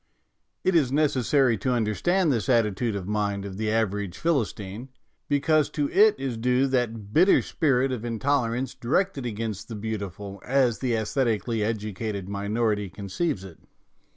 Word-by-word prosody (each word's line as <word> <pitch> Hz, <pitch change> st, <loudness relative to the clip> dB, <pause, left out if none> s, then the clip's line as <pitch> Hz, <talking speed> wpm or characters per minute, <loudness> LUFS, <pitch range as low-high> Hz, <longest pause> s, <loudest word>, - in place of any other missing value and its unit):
It 185 Hz, -, +2 dB
is 145 Hz, -7 st, +3 dB
necessary 135 Hz, -4 st, +2 dB
to 130 Hz, -, 0 dB
understand 150 Hz, -, +1 dB
this 110 Hz, -3 st, -2 dB
attitude 115 Hz, -2 st, +2 dB
of 95 Hz, -2 st, -5 dB
mind 100 Hz, -1 st, -1 dB
of 95 Hz, -1 st, -7 dB
the 110 Hz, 0 st, -1 dB
average 105 Hz, -4 st, -1 dB
Philistine, 115 Hz, -, -2 dB, 0.4 s
because 145 Hz, +1 st, +2 dB
to 145 Hz, -1 st, 0 dB
it 210 Hz, +2 st, +5 dB
is 130 Hz, -4 st, -3 dB
due 125 Hz, +3 st, +2 dB
that 115 Hz, -5 st, -2 dB
bitter 180 Hz, +7 st, +5 dB
spirit 135 Hz, -4 st, +1 dB
of 120 Hz, -3 st, -4 dB
in 115 Hz, -1 st, -3 dB
tolerance 125 Hz, -1 st, 0 dB
directed 135 Hz, +3 st, -1 dB
against 110 Hz, -2 st, -4 dB
the 115 Hz, -, -6 dB
beautiful 100 Hz, -2 st, -5 dB
as 130 Hz, -3 st, +2 dB
the 125 Hz, -3 st, 0 dB
aesthetically 115 Hz, -1 st, 0 dB
educated 105 Hz, -2 st, -3 dB
minority 105 Hz, 0 st, -1 dB
conceives 100 Hz, -, -3 dB
it. 90 Hz, -4 st, -11 dB
115 Hz, 150 wpm, -26 LUFS, 105-135 Hz, 0.4 s, it